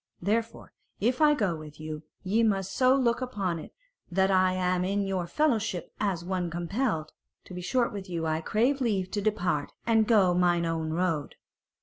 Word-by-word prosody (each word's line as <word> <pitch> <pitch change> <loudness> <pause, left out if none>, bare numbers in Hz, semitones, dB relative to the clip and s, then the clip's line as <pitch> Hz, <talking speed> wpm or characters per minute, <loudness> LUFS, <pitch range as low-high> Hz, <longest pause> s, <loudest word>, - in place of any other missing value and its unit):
Therefore 225 +5 -2 0.3
if 245 +7 +1
I 300 -1 +6
go 200 -10 0
with 155 -1 -11
you, 155 -1 -6 0.2
ye 205 +4 +2
must 195 -4 +1
so 255 0 +4
look 245 -2 +1
upon 195 -9 -2
it - - -10 0.4
that 190 +2 +2
I 185 -1 +4
am 180 -1 0
in 200 +2 0
your 190 -3 -2
fellowship 225 - 0
as 185 -5 -1
one 180 -1 -1
compelled. 170 - -2 0.3
To - - -12
be 180 - -5
short 235 +7 0
with 195 -2 -7
you, 165 -2 -2
I 160 0 0
crave 245 - +1
leave 195 -6 0
to 205 - -1
depart 180 -8 -1
and 225 -2 +3
go 200 -6 +4
mine 175 -1 +2
own 165 -1 -2
road." 165 -3 -1
190 Hz, 185 wpm, -28 LUFS, 170-220 Hz, 0.4 s, I